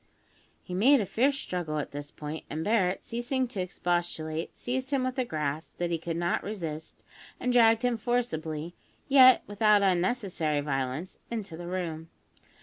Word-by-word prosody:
He 180 Hz, -, -8 dB
made 255 Hz, +10 st, +5 dB
a 210 Hz, -, 0 dB
fierce 265 Hz, +9 st, +2 dB
struggle 175 Hz, -, -3 dB
at 150 Hz, -, -3 dB
this 145 Hz, 0 st, -6 dB
point; 150 Hz, +1 st, -7 dB
and 155 Hz, +2 st, -3 dB
Barret, 195 Hz, -3 st, +1 dB
ceasing 245 Hz, +2 st, -1 dB
to 205 Hz, -6 st, -3 dB
expostulate, 175 Hz, -3 st, -2 dB
seized 260 Hz, +1 st, -3 dB
him 275 Hz, -3 st, +1 dB
with 255 Hz, +1 st, -2 dB
a 255 Hz, -, +1 dB
grasp 155 Hz, -4 st, -3 dB
that 175 Hz, -1 st, -1 dB
he 165 Hz, -, 0 dB
could 165 Hz, 0 st, -3 dB
not 175 Hz, 0 st, 0 dB
resist, 165 Hz, -7 st, -6 dB, 0.4 s
and 250 Hz, 0 st, 0 dB
dragged 230 Hz, 0 st, +5 dB
him 245 Hz, -2 st, +1 dB
forcibly, 175 Hz, -10 st, -2 dB, 0.3 s
yet 260 Hz, -2 st, +7 dB
without 205 Hz, 0 st, +3 dB
unnecessary 180 Hz, -5 st, +1 dB
violence, 135 Hz, +4 st, -3 dB
into 215 Hz, -8 st, -4 dB
the 175 Hz, +1 st, -7 dB
room. 165 Hz, -3 st, -4 dB
180 Hz, 160 wpm, -29 LUFS, 160-240 Hz, 0.4 s, yet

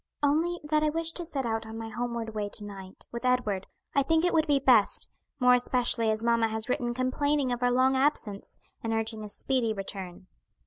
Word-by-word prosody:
"Only 325 Hz, +5 st, +2 dB
that 305 Hz, 0 st, +1 dB
I 305 Hz, -, +2 dB
wish 330 Hz, +1 st, 0 dB
to 345 Hz, -, 0 dB
set 285 Hz, -6 st, -3 dB
out 225 Hz, -1 st, -2 dB
on 220 Hz, 0 st, -7 dB
my 225 Hz, 0 st, -6 dB
homeward 235 Hz, 0 st, -4 dB
way 210 Hz, -1 st, -3 dB
to 210 Hz, -, -1 dB
night, 195 Hz, -2 st, -10 dB
with 235 Hz, +1 st, -6 dB
Edward. 245 Hz, -7 st, 0 dB, 0.3 s
I 280 Hz, -, +4 dB
think 325 Hz, +4 st, +2 dB
it 355 Hz, -, +3 dB
would 320 Hz, -1 st, +3 dB
be 290 Hz, -1 st, +4 dB
best, 250 Hz, -6 st, +4 dB, 0.3 s
more 250 Hz, -1 st, +6 dB
especially 245 Hz, -2 st, +2 dB
as 220 Hz, +1 st, 0 dB
mamma 235 Hz, -1 st, +3 dB
has 220 Hz, 0 st, -3 dB
written 240 Hz, -1 st, -1 dB
complaining 265 Hz, +2 st, 0 dB
of 245 Hz, 0 st, -2 dB
our 245 Hz, -, +3 dB
long 260 Hz, +2 st, +3 dB
absence, 260 Hz, -7 st, -1 dB, 0.3 s
and 225 Hz, 0 st, -1 dB
urging 225 Hz, -1 st, -2 dB
a 210 Hz, -, -7 dB
speedy 235 Hz, +1 st, 0 dB
return." 190 Hz, -3 st, -7 dB
245 Hz, 210 wpm, -28 LUFS, 220-280 Hz, 0.3 s, more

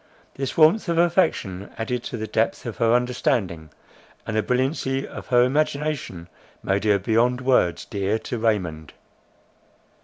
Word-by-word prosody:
This 135 Hz, -1 st, -4 dB
warmth 165 Hz, +5 st, +4 dB
of 170 Hz, -, 0 dB
affection, 165 Hz, -, +1 dB
added 120 Hz, +2 st, -2 dB
to 120 Hz, -, -5 dB
the 110 Hz, -, -4 dB
depth -, -, -1 dB
of -, -, -5 dB
her 115 Hz, +1 st, +3 dB
understanding, 115 Hz, -9 st, -1 dB, 0.6 s
and 110 Hz, -, -4 dB
the 110 Hz, -, +3 dB
brilliancy 135 Hz, +2 st, -1 dB
of -, -, -9 dB
her 125 Hz, -1 st, +4 dB
imagination, 140 Hz, -, -1 dB, 0.4 s
made 100 Hz, +1 st, 0 dB
her 105 Hz, -1 st, +4 dB
beyond 115 Hz, +5 st, +1 dB
words 125 Hz, -10 st, +2 dB
dear 100 Hz, 0 st, -1 dB
to 110 Hz, +1 st, -5 dB
Raymond. 90 Hz, -9 st, -1 dB
120 Hz, 145 wpm, -23 LUFS, 100-135 Hz, 0.6 s, warmth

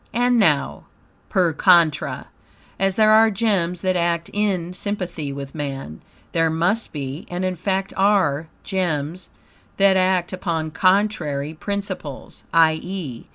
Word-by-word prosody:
And 245 Hz, 0 st, +2 dB
now, 150 Hz, -9 st, +1 dB, 0.4 s
per 175 Hz, -4 st, +2 dB
contra, 170 Hz, -2 st, +3 dB, 0.5 s
as 195 Hz, 0 st, +1 dB
there 215 Hz, -1 st, +5 dB
are 220 Hz, +1 st, +6 dB
gems 195 Hz, -5 st, 0 dB
that 185 Hz, -1 st, 0 dB
act 170 Hz, -1 st, 0 dB
in 190 Hz, -4 st, -1 dB
sympathy 180 Hz, -6 st, -4 dB
with 140 Hz, 0 st, -7 dB
man, 135 Hz, -, -6 dB, 0.3 s
there 165 Hz, -1 st, +2 dB
must 175 Hz, +8 st, 0 dB
be, 140 Hz, +2 st, -6 dB
and 180 Hz, +1 st, -3 dB
in 185 Hz, 0 st, -1 dB
fact 190 Hz, +2 st, -2 dB
are, 185 Hz, -7 st, +2 dB, 0.2 s
gems 175 Hz, -3 st, -2 dB, 0.5 s
that 195 Hz, -1 st, +4 dB
act 185 Hz, -1 st, +1 dB
upon 165 Hz, -4 st, -2 dB
contrary 160 Hz, -5 st, +1 dB
principles; 190 Hz, -5 st, -6 dB
i.e. 160 Hz, -, 0 dB
180 Hz, 125 wpm, -22 LUFS, 155-195 Hz, 0.5 s, are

